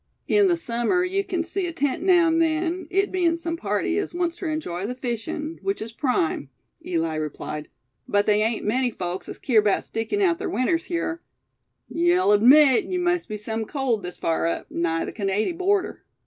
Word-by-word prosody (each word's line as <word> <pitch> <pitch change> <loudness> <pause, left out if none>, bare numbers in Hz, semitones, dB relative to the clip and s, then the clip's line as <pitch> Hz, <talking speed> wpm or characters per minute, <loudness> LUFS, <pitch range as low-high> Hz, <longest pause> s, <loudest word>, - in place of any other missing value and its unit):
"In 410 -1 +4
the 350 -2 +2
summer 240 +5 0
you 385 +2 0
kin 365 -3 -2
see 375 +1 -3
a - - -3
tent 285 -5 -1
now 355 -2 +5
an' 325 0 +2
then, 330 +2 0
it 390 +2 +1
bein' 345 -3 +1
sum 335 0 -3
party 210 - -1
as 395 - -4
wants 345 -1 -1
ter 350 - -5
enjy 200 - -3
the 250 - -4
fishin', 255 +6 -4
which 390 0 -2
is 220 +1 -5
prime," 225 - -1 0.3
Eli 165 -2 -1
replied; 150 0 -5 0.4
"but 205 0 +2
they 210 0 +3
ain't 225 +1 0
many 250 +4 +1
folks 180 -4 -5
as - - -7
keer 230 -5 +3
'bout 205 -2 +1
stickin' 225 - -3
out 355 -4 +2
ther - - -3
winters 330 - 0
hyar. 335 -1 -2 0.7
Ye'll 345 - +2
admit 260 +5 +6
they 365 - -1
must 355 0 0
be 215 - -3
sum 220 +2 -3
cold, 255 -4 -1
this 180 -1 -7
far 165 0 0
up, 170 - -3
nigh 165 -1 -1
the - - -5
Canady 205 - 0
border." 385 +2 0
285 Hz, 195 wpm, -24 LUFS, 210-350 Hz, 0.7 s, admit